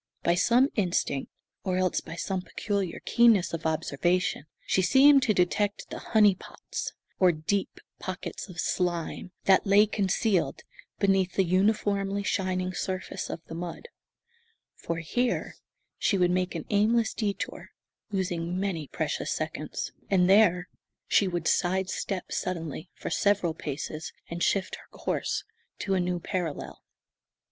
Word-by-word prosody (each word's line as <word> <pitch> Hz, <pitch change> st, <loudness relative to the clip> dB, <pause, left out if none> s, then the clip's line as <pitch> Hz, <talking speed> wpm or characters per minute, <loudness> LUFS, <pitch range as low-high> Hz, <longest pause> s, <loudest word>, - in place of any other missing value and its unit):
By 170 Hz, -, +4 dB
some 240 Hz, +9 st, +4 dB
instinct, 175 Hz, -, 0 dB, 0.3 s
or 185 Hz, -1 st, 0 dB
else 185 Hz, -1 st, +1 dB
by 160 Hz, -, -8 dB
some 190 Hz, +2 st, -2 dB
peculiar 195 Hz, -1 st, -3 dB
keenness 230 Hz, -8 st, +4 dB
of 160 Hz, -1 st, -2 dB
observation, 160 Hz, +1 st, 0 dB, 0.2 s
she 190 Hz, -, +2 dB
seemed 275 Hz, +8 st, +6 dB
to 240 Hz, -5 st, +2 dB
detect 200 Hz, +3 st, 0 dB
the -, -, -5 dB
"honey 210 Hz, -3 st, +4 dB
pots," 185 Hz, -, -7 dB, 0.3 s
or 185 Hz, -2 st, +6 dB
deep 170 Hz, +5 st, -2 dB, 0.2 s
pockets 185 Hz, +2 st, -6 dB
of 175 Hz, -1 st, -9 dB
slime, 175 Hz, 0 st, -1 dB
that 190 Hz, +1 st, +4 dB
lay 200 Hz, +2 st, +6 dB
concealed 200 Hz, -1 st, 0 dB, 0.3 s
beneath 195 Hz, -2 st, +2 dB
the 195 Hz, -, +3 dB
uniformly 200 Hz, +1 st, +1 dB
shining 185 Hz, -1 st, -1 dB
surface 185 Hz, +1 st, -4 dB
of -, -, -5 dB
the -, -, -9 dB
mud; 175 Hz, -, -6 dB, 0.8 s
for 170 Hz, -, -4 dB
here 240 Hz, +10 st, -1 dB, 0.4 s
she 200 Hz, -, +2 dB
would 180 Hz, -1 st, +3 dB
make 185 Hz, 0 st, 0 dB
an -, -, -4 dB
aimless 220 Hz, +2 st, +3 dB
detour, 205 Hz, -3 st, -3 dB, 0.4 s
losing 180 Hz, -2 st, -1 dB
many 180 Hz, -7 st, -2 dB
precious -, -, -2 dB
seconds, -, -, -3 dB, 0.2 s
and 180 Hz, -2 st, +4 dB
there 185 Hz, -3 st, +5 dB, 0.4 s
she 200 Hz, -, +4 dB
would 175 Hz, -3 st, -2 dB
side 190 Hz, +1 st, +1 dB
step 190 Hz, -3 st, -3 dB
suddenly, 165 Hz, -2 st, -3 dB
for -, -, -6 dB
several 200 Hz, -5 st, +2 dB
paces, 155 Hz, +1 st, -5 dB, 0.2 s
and 170 Hz, 0 st, -4 dB
shift 195 Hz, +1 st, +1 dB
her -, -, -16 dB
course -, -, -2 dB, 0.3 s
to 195 Hz, -, -1 dB
a 190 Hz, -, +2 dB
new 180 Hz, 0 st, 0 dB
parallel. 170 Hz, -4 st, -4 dB
185 Hz, 140 wpm, -28 LUFS, 175-200 Hz, 0.8 s, seemed